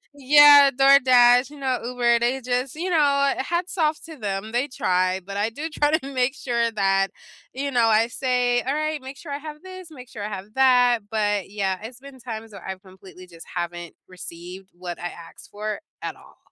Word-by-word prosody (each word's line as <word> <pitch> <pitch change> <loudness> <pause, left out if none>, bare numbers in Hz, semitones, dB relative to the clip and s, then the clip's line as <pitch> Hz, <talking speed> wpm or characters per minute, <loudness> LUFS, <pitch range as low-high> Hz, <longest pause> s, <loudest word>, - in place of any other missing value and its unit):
Yeah, 285 0 +7
DoorDash, 255 -1 +5
you 295 - -12
know, 260 -2 -1
Uber, 240 -1 +1
they 245 +3 0
just 250 +1 -2
you 350 +4 -3
know 340 - +2 0.4
what, 265 - -4
hats 350 +2 -3
off 310 -2 +1
to 325 - -10
them, 205 -2 -4
they 245 +4 0
try, 185 -7 0
but 200 +2 -8
I 215 +2 -1
do 310 +7 -6
try 295 0 0
to 275 -3 -5
make 255 +1 +1
sure 235 -4 -1
that 195 -2 +1 0.4
you 280 +2 -3
know, 240 -3 +2
I 225 +1 +3
say, 245 -1 0
"Alright, 305 +2 -2
make 270 +1 -9
sure 310 - -10
I 280 - -2
have 300 0 -10
this, 370 -2 -11
make 250 -4 -12
sure 205 - -8
I - - -3
have 205 +1 -8
that," 250 -3 +4
but, 205 -3 -1
yeah, 195 -2 -2
it's 240 +2 -9
been 275 -1 -13
times 225 -2 -8
where 195 - -11
I 190 - -4
completely 185 -1 -15
just 165 -2 -14
haven't 175 -1 -5
received 180 +1 -10
what 175 0 -7
I 175 - -4
asked 170 -1 -13
for 210 0 -4 0.2
at - - -5
all. - - -19
245 Hz, 205 wpm, -23 LUFS, 200-275 Hz, 0.4 s, Yeah